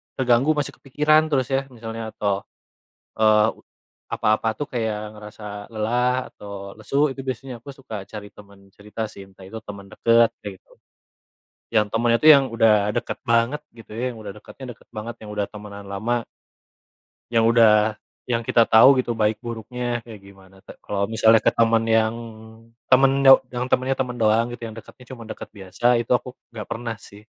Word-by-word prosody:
terganggu, 130 +2 +3
masih 145 -2 -2
kepikiran 155 +3 +2
terus 130 -3 +1
ya, 135 0 +2
misalnya 115 -2 -7
toh, 100 -1 0 0.7
eee, 110 -1 +4 0.6
apa-apa 110 +1 0
tuh 145 +6 -6
kayak 110 -3 -4
ngerasa 105 0 -12 0.3
lelah 125 +4 0
atau 100 -1 -10
lesu, 140 +7 +1
itu 135 0 -6
biasanya 130 0 -5
aku 135 +4 -11
suka 110 -7 -8
cari 105 +1 -9
temen 100 -1 -18
cerita 105 +3 -9
sih, 100 -2 -12
entah 95 0 -20
itu 110 - -7
temen 100 -1 -10
deket, 115 +1 +3
kayak 100 -2 -7
gitu. - - -30 1.0
Yang 105 -1 +4
temennya 115 +1 +2
tuh 155 - +6
yang 140 -3 +8
udah 115 -1 +4 0.2
deket - - -3
banget 115 +5 +2
gitu 115 -1 -15
ya, 120 - -2
yang - - -12
udah 100 -2 -7
dekatnya 105 +5 -13
deket - - -25
banget, 110 +2 -6
yang 105 - -11
udah 105 -1 -1
temenan 105 -1 -10
lama 115 +5 -1 1.1
yang 115 -1 +4
udah 110 -2 +4 0.3
yang 120 -2 -1
kita 115 0 +3
tahu 130 +5 +7
gitu 120 - -2
baik 110 -1 0
buruknya, 120 +1 -4
kayak 115 -2 -11
gimana, 95 -1 -17
ta - - -11
kalau 100 -1 -2
misalnya 110 +1 +4
ke - - +4
temen 115 -1 +3
yang 110 0 +2 0.7
temen 135 +1 +4
do 135 -1 +9 0.2
yang 125 0 -2
temennya 130 +1 +1
temen 125 -2 -2
doang 115 +1 +2
gitu, 120 -1 -7
yang 110 - -7
dekatnya 115 +3 -13
cuma 120 -3 -10
deket - - -7
biasa, 95 +1 -9 0.2
itu 115 - -11
aku 125 0 -11 0.2
nggak 110 -2 -8
pernah, 115 0 -4
sih. 100 +1 -15
115 Hz, 175 wpm, -22 LUFS, 105-125 Hz, 1.1 s, do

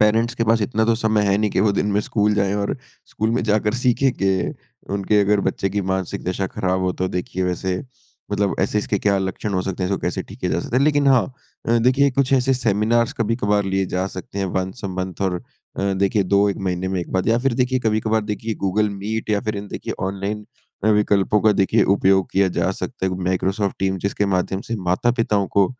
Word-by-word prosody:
Parents 115 +3 +3
के 115 - 0
पास 115 0 +3
इतना 110 0 +1
तो 115 - +3
समय 110 -2 +1
है 100 0 +3
नहीं 105 0 +1
कि 95 - +1
वो 105 -1 +3
दिन 100 - 0
में 105 - +2
स्कूल 105 0 +1
जाएँ 100 -1 +1
और 100 +3 -1 0.3
स्कूल 110 +1 -1
में 120 +2 0
जाकर 105 0 +1
सीखें 130 +1 +3
कि 95 -4 0 0.4
उनके 100 +1 +2
अगर 100 0 +3
बच्चे 95 - -1
की 105 - -1
मानसिक 95 -2 -2
दशा 95 +1 -1
ख़राब 95 0 -1
हो 90 - +1
तो 95 - +1
देखिए 90 +1 -3
वैसे 90 +1 -1 0.6
मतलब 100 -1 +1
ऐसे 100 +2 +1
इसके 100 -1 -1
क्या 100 0 +2
लक्षण 95 +2 -3
हो 90 - +1
सकते 95 0 -4
हैं? 90 - -1
जो 100 - +1
कैसे - - -2
ठीके - - -12
किया - - -1
जा - - +1
सकते 120 - -3
हैं? 130 - +3
लेकिन 145 -2 +3
हाँ, 130 -4 +5 0.4
अ, 115 - +4
देखिए 130 +4 +3
कुछ 135 0 0
ऐसे 135 0 +3
सेमिनार्स 115 +1 +1
कभी-कभार 105 -2 +1
लिए 95 0 0
जा 90 +1 -1
सकते 95 +2 -7
हैं 95 - 0
वन्स 95 +5 -5
अ - - -1
मंथ 95 0 -5
और 90 -2 -1 0.3
अ, 100 0 0
देखिए 100 +1 +2
2-1 100 +1 +2
महीने 90 0 -1
में 95 -1 -1
एक 85 - -6
बार 95 -1 0
या 115 +1 +3
फिर 135 -3 +2
देखिए 130 +1 +1
कभी-कभार 110 0 +1
देखिए 110 +1 -3
गूगल 105 +3 +2
मीट 105 +3 -4
या 105 -1 +2
फिर 110 - -1
इन 100 +1 -5
देखिए - - -5 0.2
ऑनलाइन 100 +2 -4 0.4
अ, - - +2
विकल्पों 105 -1 +3
का 110 0 +4
देखिए 105 +2 +3
उपयोग 95 0 +2
किया 95 0 +3
जा 95 - +2
सकता 110 +2 -5
है। 95 - 0
वो 90 0 -4
माइक्रोसॉफ़्ट 95 +2 0
टीम्स 95 -1 -1
जिसके 100 +1 0
माध्यम 95 +1 -1
से 115 - 0
माता-पिताओं 105 -1 +1
को 100 -1 +3
100 Hz, 230 wpm, -21 LUFS, 95-110 Hz, 0.6 s, हाँ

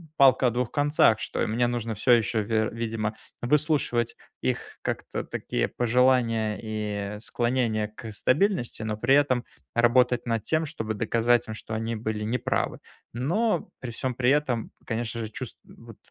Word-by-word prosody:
палка 130 -3 +6
о - - +2
двух 120 0 -1
концах: 145 -6 +4
что - - -3
и - - +1
мне 115 +3 +1
нужно 120 -2 -2
всё 105 +5 +2
ещё, 115 -2 +3
вер' 110 +1 +1
видимо, 110 -2 -2 0.3
выслушивать 130 -4 +1 0.3
их - - -2
как-то - - -3
такие - - -2
пожелания 120 -3 +2
и 105 -1 -3
склонения 120 -2 0
к 110 0 -8
стабильности, 130 - +1
но 110 -1 -2
при 120 +6 +3
этом 130 -4 +3 0.3
работать 120 +1 +3
над 115 -2 0
тем, 160 0 +1
чтобы 115 -8 -3
доказать 115 +2 +2
им, 110 - -5
что 110 - -7
они 115 +1 -2
были 110 -1 -3
не 115 +4 0
правы. - - -1 0.4
Но 170 - 0
при 125 - -6
всем 125 +2 -3
при 125 +1 +1
этом, 135 -5 +1
конечно 115 0 -3
же, 110 - -4
чувство - - -7 0.3
вот, - - -12
120 Hz, 165 wpm, -26 LUFS, 110-125 Hz, 0.4 s, палка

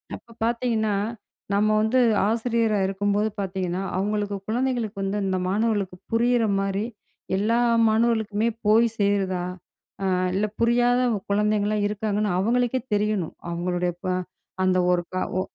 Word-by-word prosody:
அப்ப 230 - -14
பாத்தீங்கன்னா, 230 -2 0 0.6
நம்ம 205 +1 +3
வந்து 220 +4 +2 0.3
ஆசிரியரா 225 -1 +1
இருக்கும் 200 +1 0
போது 210 +1 +2
பாத்தீங்கன்னா, 185 -2 -2 0.2
அவங்களுக்கு 205 +1 -1
குழந்தைங்களுக்கு 235 -2 -1
வந்து, 195 +1 -1
அந்த 190 -1 0
மாணவர்களுக்கு 205 -2 0
புரியிற 240 +1 +3 0.2
மாரி 195 +1 -1 0.5
எல்லா 220 +4 +1 0.3
மாணவர்களுக்குமே 220 -1 +1 0.2
போய் 220 +3 +5
சேருதா, 195 -3 +1 0.6
அ - - 0 0.3
இல்ல 200 +3 +1
புரியாத 240 +1 +3 0.3
குழந்தைங்கலாம் 210 0 +1
இருக்காங்கன்னு 210 0 -1
அவங்களுக்கே 245 +4 +1
தெரியணும். 205 -5 -1
அவங்களுடைய 175 +1 -1
ப்ப 185 - -6 0.6
அந்த 185 0 +3
ஒரு 180 -1 +2
க - - -2 0.2
ஒ - - +2
210 Hz, 125 wpm, -24 LUFS, 195-230 Hz, 0.6 s, போய்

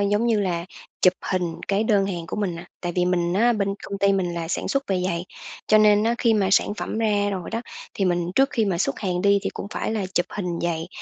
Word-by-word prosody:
giống 205 +3 +1
như 225 -3 +2
là 175 -4 -1 0.4
chụp 185 - +6 0.2
hình 175 -3 -1
cái 200 +2 +1
đơn 205 -3 +3
hàng 175 -4 -4
của - - -5
mình 200 -5 -1
nè. 170 +1 -8 0.2
Tại 175 -1 -3
vì 180 - +3
mình 175 -1 +1
á, 235 +5 +4
bên 200 -3 -1
công 200 - -5
ty 200 0 +3
mình 180 -3 0
là 165 -1 -4
sản - - -2
xuất 275 0 0
về 185 -2 0
giày, 170 -1 -2 0.4
cho 215 - +5
nên 210 -1 +5
á 230 +1 +2
khi 230 -2 +3
mà 200 -3 +2
sản 200 - +3
phẩm 215 - -4
ra 205 -2 +1
rồi 185 -3 -4
đó 225 - -2 0.3
thì 195 - 0
mình 175 -1 0
trước 270 0 +4
khi 225 - +1
mà 190 -4 0
xuất 135 -6 0
hàng 180 -2 -1
đi 200 0 +4
thì - - -2
cũng - - -5
phải - - -2
là 210 -4 -1
chụp 175 - +2
hình 180 -4 -3
giày, 165 -1 -2
195 Hz, 265 wpm, -24 LUFS, 175-210 Hz, 0.4 s, chụp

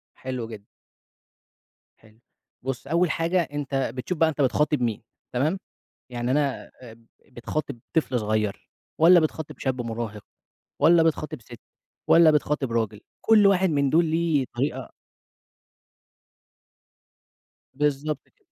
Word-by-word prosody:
حلو 125 -3 -5
جدًا. 105 -3 -10 1.3
حلو، 110 0 -22 0.5
بُصّ 135 0 -4
أول 170 +1 +2
حاجة 170 +2 +1
أنت 140 -5 -2
بتشوف 155 +7 -4
بقى 160 0 +4
أنت 145 -2 -3
بتخاطب 150 +1 +1
مين، 115 -3 -1 0.3
تمام؟ 155 +10 0 0.5
يعني 120 +1 -2
أنا 140 -2 -1
اب 115 -1 -14 0.3
بتخاطب 120 +1 -5 0.2
طفل 130 -6 +1
صغيّر، 105 -1 -2 0.3
والّا 175 +2 +7
بتخاطب 155 -2 -3
شاب 130 -2 -1
مراهق، 115 -3 -5 0.6
والّا 165 0 +6
بتخاطب 155 -5 -1
ست، 120 +1 -13 0.5
والّا 165 -2 +7
بتخاطب 150 -4 0
راجل، 110 -2 -1 0.2
كُلّ 215 -2 +6
واحد 190 -2 +3
من 140 -2 +1
دول 165 +3 +4
ليه 160 -4 +1
طريقة 130 0 -3 2.8
بالضبط 145 0 -1
كده. - - -46
140 Hz, 120 wpm, -25 LUFS, 120-160 Hz, 2.8 s, والّا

